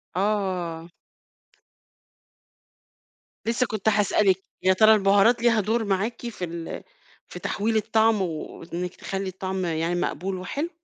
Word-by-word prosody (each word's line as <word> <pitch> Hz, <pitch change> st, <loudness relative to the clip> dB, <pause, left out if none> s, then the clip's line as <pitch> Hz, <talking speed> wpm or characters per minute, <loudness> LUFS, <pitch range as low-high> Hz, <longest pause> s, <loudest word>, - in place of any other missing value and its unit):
آه. 185 Hz, -4 st, -1 dB, 2.5 s
لسه 235 Hz, +3 st, +1 dB
كنت 215 Hz, -1 st, 0 dB
هاسألِك، 200 Hz, -2 st, +2 dB, 0.2 s
يا 190 Hz, 0 st, +5 dB
ترى 215 Hz, +3 st, +6 dB
البهارات 205 Hz, +3 st, +4 dB
ليها 235 Hz, -2 st, +4 dB
دور 225 Hz, +3 st, 0 dB
معاكِ 205 Hz, +4 st, -1 dB
في 210 Hz, -6 st, -4 dB
ال 170 Hz, -1 st, -6 dB, 0.4 s
في -, -, -9 dB
تحويل 220 Hz, +2 st, -1 dB
الطعم 220 Hz, 0 st, +2 dB
وإنك 170 Hz, +1 st, -5 dB
تخلّي 195 Hz, 0 st, -4 dB
الطعم 190 Hz, 0 st, -3 dB
يعني 165 Hz, +1 st, -1 dB
مقبول 185 Hz, +2 st, -2 dB
وحلو؟ 280 Hz, -, -3 dB
195 Hz, 115 wpm, -25 LUFS, 180-220 Hz, 2.5 s, ترى